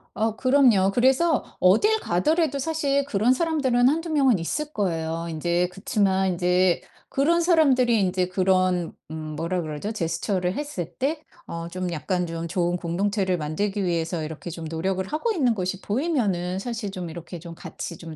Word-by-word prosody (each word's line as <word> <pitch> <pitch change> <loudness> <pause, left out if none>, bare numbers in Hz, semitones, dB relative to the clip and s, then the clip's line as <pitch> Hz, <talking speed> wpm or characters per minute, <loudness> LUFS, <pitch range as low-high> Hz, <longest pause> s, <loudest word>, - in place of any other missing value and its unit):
아 220 0 0
그럼요. 250 -8 +4
그래서 265 +6 +3 0.2
어딜 415 - +4
가더라도 285 - +1
사실 280 -2 0
그런 235 -1 +2
사람들은 260 -5 +2
1-2 330 +3 -1
명은 270 -8 +3
있을 300 - -3
거예요, 165 -4 -2
인제. 170 +2 0
그치만 195 -2 +1
인제 180 0 +2 0.3
그런 335 +5 +2
사람들이 270 - +4
인제 185 -1 +1
그런 185 -2 +1 0.2
음 160 - -5 0.2
뭐라 175 +2 -1
그러죠? 155 +6 -4
제스처를 180 -1 -1
했을 190 - -4
때 300 +4 -1 0.3
어 170 0 -5
좀 185 0 -3
약간 180 +2 -1
좀 165 0 -4
좋은 175 0 0
공동체를 185 +2 0
만들기 195 +7 -2
위해서 165 -2 -1
이렇게 160 +2 -6
좀 165 0 -7
노력을 185 +4 -2
하고 315 +10 -1
있는 265 - +2
것이 185 0 -3
보이면은 205 - -1
사실 225 -2 -4
좀 180 -3 -5
이렇게 170 +1 -8
좀 170 0 -10
같이 170 +1 -7
좀 165 -2 -9
190 Hz, 335 characters per minute, -24 LUFS, 175-260 Hz, 0.3 s, 그럼요